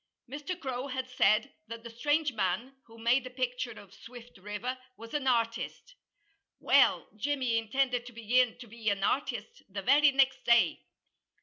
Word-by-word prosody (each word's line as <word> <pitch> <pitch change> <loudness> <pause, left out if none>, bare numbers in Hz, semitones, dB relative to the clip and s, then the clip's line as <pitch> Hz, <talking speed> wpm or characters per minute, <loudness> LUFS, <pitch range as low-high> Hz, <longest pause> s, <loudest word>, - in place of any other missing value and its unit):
Mr. 295 +7 -5
Crow 260 -2 -4
had 260 -1 -4
said 215 -4 +3
that 230 0 -8
the 235 - -8
strange 290 +4 0
man, 215 +6 -2
who 230 0 -15
made 235 +3 +2
the 255 - -7
picture 250 -1 -3
of 195 -2 -15
Swift 240 -2 -13
River, 210 +6 -4 0.2
was 230 0 -11
an 290 -3 -1
artist. 235 - -1 0.7
Well, - - +4
Jimmy 255 -1 0
intended 245 +2 0
to - - -9
begin 235 +2 +2
to 245 - -10
be 225 0 -3
an 200 -1 -1
artist 460 - -2
the 195 0 -5
very 285 +5 +6
next 270 -1 +2
day. 235 -1 +4
245 Hz, 165 wpm, -30 LUFS, 230-265 Hz, 0.7 s, very